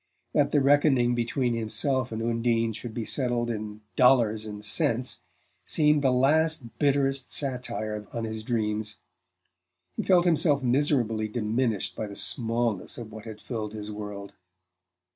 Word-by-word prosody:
That 145 -2 +3
the 145 - +2
reckoning 135 -3 +3
between 120 +1 -1
himself 125 +3 0
and 110 0 -4
Undine 115 -1 0
should 120 +2 -7
be 115 - -3
settled 120 -2 +1
in 105 -1 -6
dollars 115 -4 +3
and 105 0 -6
cents 120 +4 +1 0.4
seemed 150 -1 +2
the 135 - +3
last 140 0 +1
bitterest 135 -2 +1
satire 120 -6 -2
on 115 - -4
his 110 -1 -4
dreams: 105 -2 -2 1.0
he - - -2
felt 180 -2 +3
himself 150 -4 +3
miserably 120 -4 +1
diminished 110 0 -1
by 110 - -4
the 100 - -9
smallness 115 -4 0
of 115 -3 -8
what 110 +1 -10
had 110 -2 -9
filled 110 -4 -5
his 105 -1 -6
world. 105 -1 -7
120 Hz, 145 wpm, -27 LUFS, 110-135 Hz, 1.0 s, That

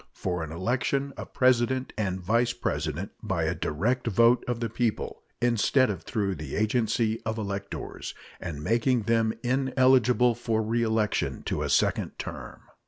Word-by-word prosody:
For 90 -2 -2
an 80 - -6
election 130 +9 -1
of - - -8
President 130 0 +2
and 95 -4 -1
Vice 115 +6 +1
President 80 - -3
by - - -1
a - - +1
direct 120 +11 -1
vote 115 +3 +4
of 120 -1 -1
the 115 - -1
people, 115 0 -2 0.2
instead 120 +1 +3
of 95 - -5
through 100 -3 -1
the 80 -4 -6
agency 110 0 +1
of 110 0 -2
electors, 100 -2 -5 0.2
and 75 -3 -6
making 115 - +2
them 115 0 +2
ineligible 130 -1 +3
for 115 -1 -1
reelection 110 -1 0
to - - -2
a - - -1
second - - +1
term. - - -7
115 Hz, 150 wpm, -27 LUFS, 100-125 Hz, 0.2 s, vote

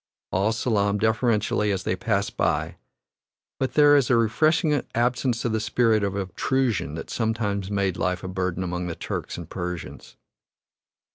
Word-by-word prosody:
All 100 +4 +2
salaam 105 -3 +1
deferentially 110 -1 +1
as 95 -2 -2
they - - 0
pass 100 +1 -1
by, - - -1 0.8
but 130 - -2
there 145 -1 +7
is 140 -4 +3
a 130 - +5
refreshing 150 - +2
absence 120 0 0
of 120 - +1
the 110 - 0
spirit 110 -1 +2
of 100 -1 -1
obtrusion 100 - -1
that 80 - -7
sometimes 105 -4 -1
made 100 -3 0
life 90 0 -1
a - - -4
burden 95 -1 -2
among 90 0 -3
the 85 - -4
Turks - - -5
and - - -7
Persians. 90 -1 -6
105 Hz, 155 wpm, -25 LUFS, 95-120 Hz, 0.8 s, there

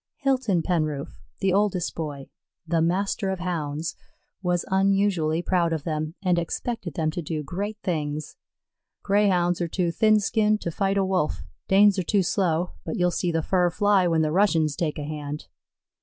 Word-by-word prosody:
Hilton 255 - +1
Penroof, 155 - -2 0.2
the 190 -1 +2
oldest 200 -3 +1
boy, 145 -4 -6 0.4
"The 165 0 +1
Master 195 +4 0
of 190 - -1
Hounds," 165 -3 -3 0.5
was 180 -2 0
unusually 190 -4 +2
proud 175 -3 +1
of 155 -3 -3
them, 155 0 -3
and 180 -2 +2
expected 180 - -4
them 155 -1 0
to 175 - -4
do 155 -1 -4
great 200 +8 -4
things. 150 -4 -3 0.7
"Greyhounds 185 -4 +2
are 170 - 0
too 175 0 -1
thin 215 +4 +4
skinned 215 0 +2
to 170 - -3
fight 195 +3 0
a 195 - +2
Wolf, 185 -5 -1 0.2
Danes 200 0 +5
are - - 0
too 200 +2 +2
slow, 175 -2 0
but 160 - -4
you'll 180 0 +2
see 175 0 -1
the 165 -1 0
fur 180 0 +2
fly 200 0 +3
when 165 -2 +2
the 155 - 0
Russians 165 -5 +2
take 155 0 -2
a 150 - -4
hand." 150 0 -5
175 Hz, 170 wpm, -25 LUFS, 160-195 Hz, 0.7 s, Danes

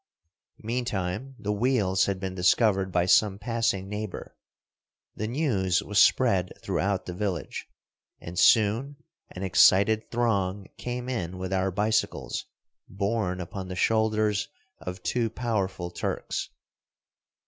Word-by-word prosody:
Meantime 115 +1 -3
the 105 -2 -3
wheels 105 -4 +2
had 100 -1 -1
been 95 -1 -4
discovered 95 +1 +2
by 90 -1 +2
some 100 +1 +4
passing 115 -4 -1
neighbor. 105 -1 -6 0.8
The 110 - -3
news 100 - +1
was 105 -1 +3
spread 95 -8 +3
throughout 100 -1 -1
the 90 - -5
village, 90 -5 -3 0.5
and 85 +1 -5
soon 115 +6 +4 0.3
an 90 - -7
excited 100 +3 +4
throng 100 -5 0
came 125 0 -4
in 95 -8 -3
with 95 +1 -4
our 95 0 +1
bicycles 105 - -1 0.4
borne 100 -1 -1
upon 95 +2 -6
the 90 - -5
shoulders 110 0 +1 0.3
of 90 0 -7
two 120 -2 0
powerful 100 -7 -2
Turks. - - -3
100 Hz, 120 wpm, -27 LUFS, 95-110 Hz, 0.8 s, some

